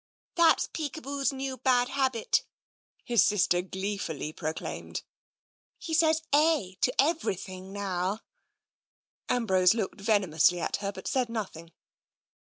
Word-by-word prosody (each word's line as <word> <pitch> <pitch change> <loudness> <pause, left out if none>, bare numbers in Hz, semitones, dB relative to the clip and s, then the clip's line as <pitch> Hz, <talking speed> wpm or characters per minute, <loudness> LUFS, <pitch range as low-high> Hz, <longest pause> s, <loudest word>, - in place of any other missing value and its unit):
" - - -
That's 335 -2 +4
Peekaboo's 285 -2 -2
new 265 -1 -4
bad 250 -2 +2
habit," 260 -5 +1 0.6
his 235 -4 +4
sister 180 -3 +3
glee 190 +2 -4
8o - - -10
TENSION - - -3
fully 150 +3 -5
proclaimed. 155 +1 -5 0.4
" - - -80 0.3
He 330 - -6
says 320 0 +3
' - - -10
eh 300 - +3
' - - -50
to 250 - +3
everything 190 - -1
now." 195 +1 -2 1.1
Ambrose 190 -6 +3
looked 210 -2 -3
venomously 185 -5 +3
at - - -1
her, 200 0 -3
but 190 -1 -9
said 255 -3 0
noth 220 -6 -4
ing. 165 +1 -12
215 Hz, 150 wpm, -28 LUFS, 185-275 Hz, 1.1 s, That's